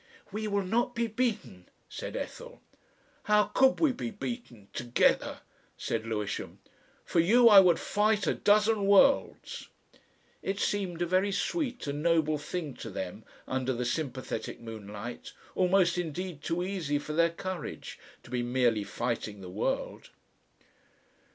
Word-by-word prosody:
"We 215 Hz, +2 st, -3 dB
will 200 Hz, -1 st, 0 dB
not 240 Hz, +6 st, 0 dB
be 235 Hz, 0 st, +1 dB
beaten," 220 Hz, -, -2 dB, 0.2 s
said -, -, -6 dB
Ethel. -, -, -6 dB, 0.7 s
"How 210 Hz, 0 st, +5 dB
could 265 Hz, 0 st, +4 dB
we 315 Hz, -4 st, +4 dB
be 240 Hz, -1 st, -4 dB
beaten 205 Hz, -, -7 dB
together?" 120 Hz, 0 st, +1 dB, 0.4 s
said 115 Hz, 0 st, -3 dB
Lewisham. 105 Hz, -2 st, -3 dB, 0.5 s
"For 170 Hz, -, +1 dB
you 230 Hz, +8 st, +6 dB
I 205 Hz, -2 st, +10 dB
would 180 Hz, -3 st, +5 dB
fight 210 Hz, -1 st, +1 dB
a -, -, +2 dB
dozen 210 Hz, 0 st, +3 dB
worlds." 200 Hz, +8 st, +3 dB, 0.7 s
It 195 Hz, +1 st, -2 dB
seemed 180 Hz, -4 st, -1 dB
a -, -, +1 dB
very 185 Hz, +3 st, +2 dB
sweet 255 Hz, -, -2 dB
and 145 Hz, 0 st, -3 dB
noble 160 Hz, -2 st, +2 dB
thing 150 Hz, -1 st, -4 dB
to 115 Hz, -, -7 dB
them 95 Hz, +2 st, -6 dB, 0.2 s
under 130 Hz, 0 st, -1 dB
the 125 Hz, 0 st, -2 dB
sympathetic 130 Hz, 0 st, -3 dB
moonlight, 110 Hz, 0 st, -8 dB, 0.2 s
almost 180 Hz, -1 st, +3 dB
indeed 175 Hz, -1 st, -4 dB
too 170 Hz, +3 st, -1 dB
easy 180 Hz, -7 st, -1 dB
for 150 Hz, +1 st, -5 dB
their 170 Hz, +2 st, +4 dB
courage, 180 Hz, 0 st, -6 dB, 0.2 s
to 120 Hz, -, -15 dB
be 125 Hz, -1 st, 0 dB
merely 120 Hz, -3 st, +1 dB
fighting 110 Hz, -2 st, -3 dB
the 90 Hz, -, -8 dB
world. 100 Hz, -, -2 dB
170 Hz, 140 wpm, -29 LUFS, 125-205 Hz, 0.7 s, I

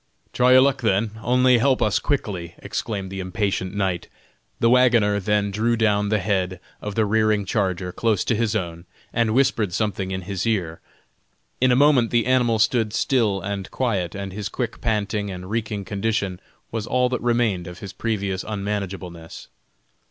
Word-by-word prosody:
"Try 125 Hz, +1 st, +4 dB
your 130 Hz, -, +8 dB
luck 135 Hz, 0 st, +2 dB
then, 110 Hz, -1 st, +1 dB
only 125 Hz, +1 st, +4 dB
help 130 Hz, +1 st, +3 dB
us 105 Hz, -, +2 dB
quickly!" 95 Hz, -, -2 dB
exclaimed 100 Hz, -2 st, -4 dB
the 95 Hz, -, -5 dB
impatient 95 Hz, 0 st, -2 dB
knight. 95 Hz, -3 st, -1 dB, 0.5 s
The 115 Hz, -, +3 dB
wagoner 120 Hz, -5 st, +4 dB
then 100 Hz, 0 st, 0 dB
drew 115 Hz, +4 st, +1 dB
down 105 Hz, -2 st, +2 dB
the 110 Hz, -, +2 dB
head 95 Hz, -2 st, -1 dB, 0.2 s
of 105 Hz, -1 st, -5 dB
the 110 Hz, -, +2 dB
rearing 110 Hz, -1 st, +2 dB
charger 95 Hz, -3 st, -1 dB
close 110 Hz, -1 st, 0 dB
to 115 Hz, -, +1 dB
his 110 Hz, -1 st, 0 dB
own, 85 Hz, -4 st, -4 dB, 0.3 s
and 115 Hz, -1 st, +1 dB
whispered 125 Hz, -8 st, +2 dB
something 100 Hz, -2 st, -1 dB
in 95 Hz, 0 st, -3 dB
his 95 Hz, +2 st, -3 dB
ear. 90 Hz, -8 st, -1 dB, 0.8 s
In 130 Hz, 0 st, +5 dB
a -, -, +5 dB
moment 135 Hz, -4 st, +4 dB
the 120 Hz, -1 st, +2 dB
animal 125 Hz, -3 st, +3 dB
stood 110 Hz, -1 st, +2 dB
still 110 Hz, -9 st, +1 dB
and 100 Hz, +1 st, -4 dB
quiet, 100 Hz, -9 st, -1 dB
and 100 Hz, -1 st, -5 dB
his 105 Hz, 0 st, -4 dB
quick 125 Hz, -3 st, -4 dB
panting 105 Hz, -2 st, -1 dB
and 90 Hz, 0 st, -7 dB
reeking 105 Hz, -3 st, -2 dB
condition 100 Hz, -3 st, -2 dB, 0.3 s
was 110 Hz, -1 st, -3 dB
all 125 Hz, 0 st, +2 dB
that 125 Hz, -2 st, -2 dB
remained 115 Hz, -7 st, +1 dB
of 90 Hz, 0 st, -8 dB
his 95 Hz, 0 st, -8 dB
previous 100 Hz, -4 st, -2 dB
unmanageableness. 100 Hz, -5 st, -5 dB
105 Hz, 170 wpm, -23 LUFS, 95-115 Hz, 0.8 s, your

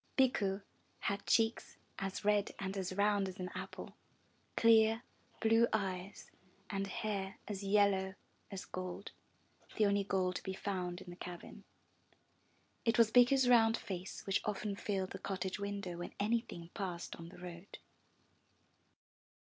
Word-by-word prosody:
Bikku 205 Hz, -7 st, +3 dB, 0.4 s
had 200 Hz, 0 st, -2 dB
cheeks 225 Hz, 0 st, +2 dB, 0.2 s
as 195 Hz, +1 st, -3 dB
red 205 Hz, -1 st, +2 dB
and 195 Hz, 0 st, -3 dB
as 190 Hz, -2 st, -2 dB
round 200 Hz, 0 st, +2 dB
as 185 Hz, -, -9 dB
an 180 Hz, 0 st, -4 dB
apple, -, -, -6 dB, 0.6 s
clear, 225 Hz, 0 st, +6 dB, 0.4 s
blue 225 Hz, +1 st, +5 dB
eyes 195 Hz, -2 st, -2 dB, 0.4 s
and 195 Hz, -1 st, -1 dB
hair 195 Hz, -1 st, -3 dB
as 205 Hz, -2 st, -4 dB
yellow 195 Hz, -1 st, +3 dB, 0.3 s
as 195 Hz, -2 st, -6 dB
gold, 185 Hz, +2 st, -5 dB, 0.7 s
the 215 Hz, -, +5 dB
only 200 Hz, 0 st, +3 dB
gold 185 Hz, -2 st, 0 dB
to -, -, -7 dB
be 190 Hz, -, -4 dB
found 180 Hz, -2 st, -3 dB
in 180 Hz, -, -9 dB
the -, -, -8 dB
cabin. 175 Hz, -1 st, -9 dB, 1.2 s
It 230 Hz, +1 st, +2 dB
was 230 Hz, -2 st, +6 dB
Bikku's 250 Hz, +2 st, +6 dB
round 225 Hz, -2 st, +6 dB
face 185 Hz, -1 st, -6 dB
which 195 Hz, 0 st, +1 dB
often 210 Hz, -1 st, -2 dB
filled 195 Hz, -2 st, -2 dB
the 190 Hz, -, -6 dB
cottage 190 Hz, 0 st, -3 dB
window 200 Hz, -3 st, -3 dB
when 175 Hz, -, -6 dB
any 220 Hz, +3 st, +3 dB
thing 170 Hz, -7 st, -10 dB
passed 180 Hz, -4 st, -4 dB
on 165 Hz, 0 st, -9 dB
the -, -, -13 dB
road. 180 Hz, +1 st, -9 dB
195 Hz, 145 wpm, -35 LUFS, 185-215 Hz, 1.2 s, clear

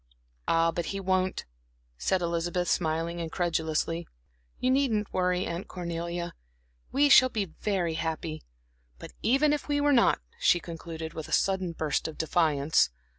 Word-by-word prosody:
"Ah, 165 Hz, 0 st, +3 dB
but 170 Hz, +1 st, -3 dB
he 195 Hz, -, -3 dB
won't," 185 Hz, -1 st, 0 dB, 0.5 s
said 180 Hz, -, 0 dB
Elizabeth, 170 Hz, +1 st, -1 dB
smiling 165 Hz, +1 st, 0 dB
incredulously. 165 Hz, 0 st, -1 dB, 0.5 s
"You 255 Hz, -, +1 dB
needn't 245 Hz, -6 st, +1 dB
worry, 180 Hz, 0 st, +1 dB
Aunt 170 Hz, +2 st, -4 dB
Cornelia; 170 Hz, 0 st, -4 dB, 0.6 s
we 285 Hz, +2 st, +4 dB
shall 260 Hz, -2 st, +7 dB
be 215 Hz, -5 st, -1 dB, 0.2 s
very 185 Hz, -6 st, 0 dB
happy. 160 Hz, -1 st, -3 dB, 0.6 s
But -, -, -10 dB
even 275 Hz, +6 st, +3 dB
if 295 Hz, -, -3 dB
we 290 Hz, -1 st, +1 dB
were 290 Hz, 0 st, +3 dB
not," 235 Hz, -, +4 dB, 0.2 s
she 175 Hz, -, +4 dB
concluded, 165 Hz, -1 st, -7 dB
with 160 Hz, -2 st, -6 dB
a -, -, -12 dB
sudden 190 Hz, -3 st, +1 dB
burst 155 Hz, -1 st, -1 dB
of 160 Hz, -, -8 dB
defiance. 155 Hz, -, +2 dB
175 Hz, 145 wpm, -28 LUFS, 165-195 Hz, 0.6 s, shall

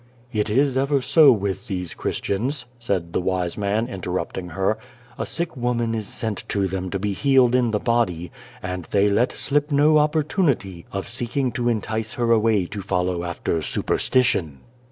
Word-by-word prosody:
" 120 Hz, +2 st, -29 dB
It 105 Hz, -1 st, 0 dB
is 130 Hz, +4 st, +2 dB
ever 140 Hz, +1 st, +2 dB
so 145 Hz, +2 st, +6 dB
with 100 Hz, -3 st, -2 dB
these 90 Hz, -3 st, -3 dB
Christians," 125 Hz, +7 st, -2 dB
said 95 Hz, -7 st, -2 dB
the -, -, +1 dB
wise 90 Hz, -1 st, -1 dB
man, 105 Hz, +3 st, 0 dB
interrupting 90 Hz, -2 st, -4 dB
her. 95 Hz, +5 st, 0 dB, 0.2 s
" 120 Hz, -, -25 dB
A -, -, -2 dB
sick 170 Hz, +1 st, -3 dB
woman 120 Hz, -2 st, -1 dB
is 110 Hz, -3 st, -3 dB
sent 110 Hz, -2 st, -3 dB
to 100 Hz, -2 st, +1 dB
them 95 Hz, 0 st, -3 dB
to 100 Hz, -, -2 dB
be 100 Hz, +1 st, -2 dB
healed 130 Hz, +1 st, +3 dB
in 125 Hz, -2 st, +3 dB
the 105 Hz, -1 st, 0 dB
body, 100 Hz, -9 st, 0 dB, 0.3 s
and 90 Hz, -2 st, -4 dB
they 100 Hz, 0 st, +2 dB
let 115 Hz, +5 st, +2 dB
slip 145 Hz, +1 st, -1 dB
.no 150 Hz, +2 st, +5 dB
opportunity 150 Hz, -, 0 dB
of 100 Hz, 0 st, -4 dB
seeking 120 Hz, +2 st, -1 dB
to 120 Hz, 0 st, 0 dB
entice 110 Hz, -1 st, -2 dB
her 120 Hz, -1 st, 0 dB
away 110 Hz, -4 st, +3 dB
to 100 Hz, +3 st, -6 dB
follow 90 Hz, -2 st, -1 dB
after 85 Hz, -1 st, -2 dB
superstition." 80 Hz, -, +1 dB
110 Hz, 175 wpm, -23 LUFS, 95-125 Hz, 0.3 s, so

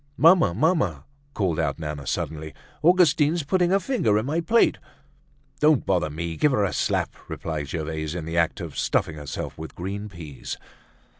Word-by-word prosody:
"Mamma! 165 Hz, -, +6 dB
Mamma!" 160 Hz, -, +1 dB, 0.3 s
called 90 Hz, -6 st, 0 dB
out -, -, 0 dB
Nana 75 Hz, -3 st, -5 dB
suddenly, 80 Hz, +1 st, -3 dB, 0.3 s
"Augustine's 165 Hz, -2 st, +4 dB
putting 175 Hz, +4 st, +2 dB
her 195 Hz, +2 st, +4 dB
fingers 155 Hz, -, +1 dB
in 110 Hz, -, -3 dB
my 155 Hz, +5 st, 0 dB
plate!" 225 Hz, +8 st, +3 dB, 0.8 s
"Don't 150 Hz, -3 st, +4 dB
bother 90 Hz, -5 st, +1 dB
me! 85 Hz, +2 st, -4 dB
give 150 Hz, -, +3 dB
her 105 Hz, -, +2 dB
a 95 Hz, -, -2 dB
slap!" -, -, 0 dB
replied 75 Hz, -3 st, -4 dB
Gervaise, 80 Hz, 0 st, -3 dB
in 85 Hz, -3 st, -4 dB
the 80 Hz, +1 st, -4 dB
act 85 Hz, -1 st, +1 dB
of -, -, -7 dB
stuffing 80 Hz, -, 0 dB
herself 75 Hz, +1 st, -6 dB
with 80 Hz, -, -8 dB
green 100 Hz, +4 st, -5 dB
peas. 80 Hz, -7 st, -7 dB
95 Hz, 165 wpm, -25 LUFS, -, 0.8 s, Mamma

